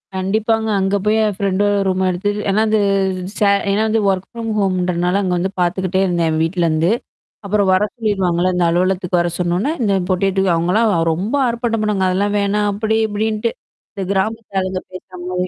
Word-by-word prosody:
கண்டிப்பாங்க. 220 +4 0
அங்க 195 +1 +1
போய் 215 +1 +3
என் 210 - +1
ஃப்ரெண்டோட 205 0 +1
ரூம் 190 0 0
எடுத்து 185 +3 -1 0.2
ஏன்னா 200 +2 +2
அது 215 0 +2 0.6
ச - - -14 0.3
ஏன்னா 210 +2 +1
வந்து 220 0 +1
ஒர்க் 190 -1 -1
ஃப்ரம் 230 -1 -6
ஹோம் 195 -2 +1
இன்றனால 180 +1 0
அங்க 185 -2 -1
வந்து 190 +2 -1
பாத்துக்கிட்டே 185 +1 0
இருந்தேன் 175 -3 0
என் 155 - 0
வீட்லருந்து. 165 0 +1 0.5
அப்புறம் 200 -1 +1
வர 185 +2 +3
சொல்லிருவாங்கல்ல. 185 -6 0
இந்த 180 -1 +2
அலுவலகத்துக்கு 180 +1 +1
வர 175 - 0
சொன்னோனே, 180 - 0
இந்த 205 -3 +2 0.2
பொட்டியேட்டுக்கு 190 -1 +1
அவங்கலாம் 185 +7 +2 0.2
ரொம்ப 195 - -3
ஆர்ப்பாட்டம் 235 -2 -1
பண்ணுவாங்க. 200 -3 +1
அதெல்லாம் 205 +3 0
வேணாம் 205 +1 +1
அப்படி 220 +2 0
இப்படின்ட்டு. 215 +2 -1 0.4
இந்த 195 - -4
கிராமத்த 210 0 -2
ஆளுங்க 185 0 -3
பேசுறமாரி. 180 0 -5
190 Hz, 165 wpm, -18 LUFS, 180-210 Hz, 0.6 s, போய்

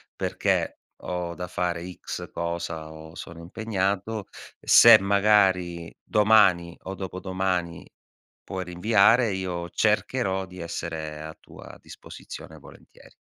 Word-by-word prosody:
perché - - -1 0.2
ho 90 -1 -4
da 90 0 -5
fare 90 0 -3
X - - -7
cosa 85 -2 -4
o 80 +1 -12
sono 85 -2 -9
impegnato. 100 +2 -2 0.3
Se 115 -2 +8
magari 95 -4 +2
domani 100 -6 +4
o 95 +1 -5
dopodomani 95 -2 -3 0.6
puoi 95 -2 -5
rinviare, 105 +5 +3
io 90 -2 -4
cercherò 105 -3 0
di 90 0 -13
essere 80 -2 -5
a 80 0 -9
tua - - -13
disposizione - - -11
volentieri." - - -17
90 Hz, 110 wpm, -25 LUFS, 85-100 Hz, 0.6 s, Se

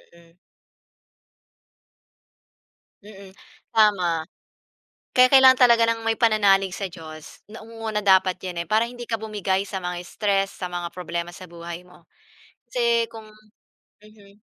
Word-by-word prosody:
Mm. 170 0 -22 2.7
Mm, 200 -2 -14 0.4
tama. 185 -7 +2 0.9
Kaya 255 0 +6
kailangan 260 -1 +6
talaga 235 -1 +4
ng 225 0 -5
may 225 - +2
pananalig 205 -4 +3
sa 195 +1 -4
Diyos. 160 -3 -12
Nangunguna 225 -1 -5
dapat 190 -2 +3
'yan, 175 -2 -5
eh, - - -21
para 220 +2 +2
hindi 245 0 -9
ka 230 -1 -4
bumigay 200 -3 -2
sa 190 -2 -6
mga 180 0 -4
stress, 195 -1 -1
sa 180 -2 -6
mga 175 -1 -4
problema 175 -1 -5
sa 185 -2 -12
buhay 170 0 -8
mo. 180 -1 -21 0.6
Kasi 235 -2 +1
kung 225 -1 -11 0.7
mhm. 210 -1 -20
200 Hz, 130 wpm, -23 LUFS, 180-225 Hz, 2.7 s, Kaya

